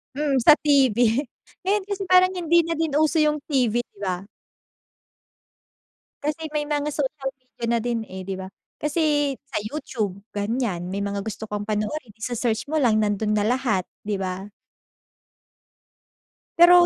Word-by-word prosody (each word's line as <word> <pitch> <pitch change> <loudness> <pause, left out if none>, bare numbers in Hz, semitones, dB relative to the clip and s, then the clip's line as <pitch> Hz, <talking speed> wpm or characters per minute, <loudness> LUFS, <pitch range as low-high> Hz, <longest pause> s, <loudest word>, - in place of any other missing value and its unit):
Hmm, 285 -2 +1
sa 305 - +10
TV 275 -7 +3 0.7
Ngayon 405 +1 +2
kasi 400 -1 -2
parang 370 0 +6
hindi 340 0 +4
na 330 -1 -3
din 320 -3 0
uso 310 +2 +3
yung 300 -1 +3
TV, 240 -4 +2
'di 240 - -25
ba? 185 0 -2 2.0
Kasi 305 +2 -2
may 295 - +1
mga 295 0 -1
social 275 -2 -2
media 255 -2 -8
na 235 0 +2
din, 240 -1 0
eh, 190 0 -7
'di 190 0 -4
ba. 190 - -5 0.3
Kasi 295 -2 +1
sa 265 -6 -2
YouTube 215 -6 -3 0.2
ganyan, 205 -4 -1
may 200 - -2
mga 200 0 -2
gusto 220 0 -5
kong 205 0 -2
panoorin 215 +4 -2
ise-search 230 +2 -2
mo - - 0
lang 225 -6 +4
nando'n 210 +1 0
na 205 - +2
lahat 240 -6 +1 0.2
'di 210 - 0
ba? 190 +1 -3 2.1
Pero 350 +1 +9
260 Hz, 150 wpm, -24 LUFS, 210-300 Hz, 2.1 s, sa